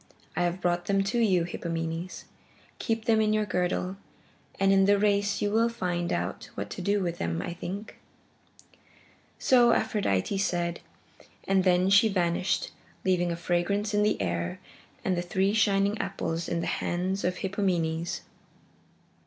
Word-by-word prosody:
I - - 0
have 175 +2 -2
brought 175 0 0
them 195 -1 +2
to 215 +5 0
you, 190 -7 +3
Hippomenes. 165 0 -4 0.6
Keep 225 -2 -1
them 225 -2 +4
in 215 0 +2
your 215 0 +1
girdle, 180 0 -1 0.6
and 195 0 +4
in 195 0 +5
the 205 +1 +5
race 205 0 +1
you 205 - +1
will 230 +2 +3
find 175 -6 -2
out 85 +2 -3
what 100 0 -5
to - - -5
do 200 +2 +1
with 170 -1 -3
them, 85 0 -1
I 175 - -4
think." 190 +4 -7 1.4
So 240 -2 +5
Aphrodite 200 - 0
said, 175 -3 -1 0.7
and 190 -1 +3
then 185 +1 +3
she 200 +3 +6
vanished, 180 -1 0 0.3
leaving 175 -2 +2
a - - -1
fragrance 175 +5 0
in 205 - +3
the 210 0 +2
air 85 -2 -2 0.5
and 185 - +2
the 175 - -1
three 190 +3 0
shining 200 -1 +2
apples 165 -4 -3
in 170 -1 -1
the - - -2 0.2
hands 185 +3 -1
of 180 0 0
Hippomenes. 175 -4 -1
185 Hz, 155 wpm, -28 LUFS, 175-205 Hz, 1.4 s, she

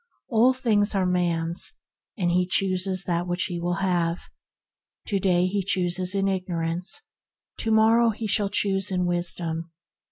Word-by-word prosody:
All 235 +2 +4
things 220 -5 +1
are 190 -1 +1
man's, 170 -1 0 0.4
and 175 -4 0
he 180 +1 +1
chooses 185 0 0
what 175 0 -2
he 175 -2 -1
will 175 +1 -1
have. 175 -3 0 0.9
To 200 -3 0
day 180 -2 +2
he 195 +2 -1
chooses 180 0 +1
in 195 0 +1
igno 185 -3 -2
rance, 175 - -2 0.6
to 225 - -2
morrow 225 +2 +4
he 225 +1 -4
shall 205 -1 +2
choose 195 -1 0
in 180 -2 0
Wis 175 0 -1
dom. 165 -1 -4
185 Hz, 155 wpm, -25 LUFS, 175-200 Hz, 0.9 s, All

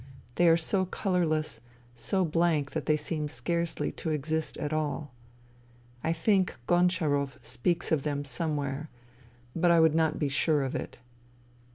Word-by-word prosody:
They 175 +6 +4
are 165 - +6
so 185 +3 0
colourless, 165 - 0 0.3
so 185 +10 0
blank 160 -3 +1
that - - -4
they 155 - +4
seem 150 -1 -3
scarcely 170 +7 -2
to - - -5
exist 155 +1 -2
at 150 +1 -3
all. 150 -2 -2 0.9
I 160 - +1
think 185 +3 +2
Goncharov 160 -6 +2
speaks 165 +8 -1
of 155 -3 +3
them 145 0 -2
somewhere, 145 +1 -2 0.7
but 175 +1 +3
I 170 -1 +6
would 160 -1 +5
not 160 -1 +2
be 150 - 0
sure 145 +1 +1
of 135 - -3
it. - - -5
155 Hz, 150 wpm, -29 LUFS, 145-170 Hz, 0.9 s, are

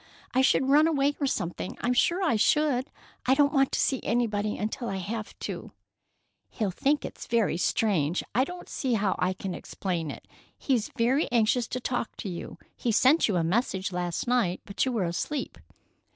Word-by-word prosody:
I 260 - +4
should 265 0 +3
run 295 +3 +6
away 290 -2 +2
or 280 - +1
something. 175 -6 -3
I'm 250 - +1
sure 345 +9 +2
I 320 -10 +2
should. 265 +3 +2 0.4
I 265 - +5
don't 285 +1 +3
want 270 -2 +3
to - - +1
see 265 - +2
anybody 215 -3 0
until 220 +3 -3
I 195 - -2
have 215 +4 -5
to." - - -6 0.8
"He'll 210 -4 -2
think 285 +10 +1
it - - -8
very 230 -7 +2
strange. 175 -3 +1
I 250 +5 +4
don't 355 +5 -7
see 255 -4 -1
how 200 -3 +1
I 180 +1 +1
can 185 0 -5
explain 175 -5 -3
it. - - -9 0.3
He's 245 -6 0
very 255 +6 +2
anxious 235 0 +2
to 255 - -3
talk 245 -2 -3
to 200 - -5
you. 175 -1 -7 0.2
He 235 - -1
sent 260 +8 +4
you 205 - 0
a 170 - +2
message 190 +1 0
last 175 -1 -2
night, 235 -8 +1
but 200 - -1
you - - +1
were 220 -6 0
asleep." 260 - -3
235 Hz, 190 wpm, -27 LUFS, 190-265 Hz, 0.8 s, run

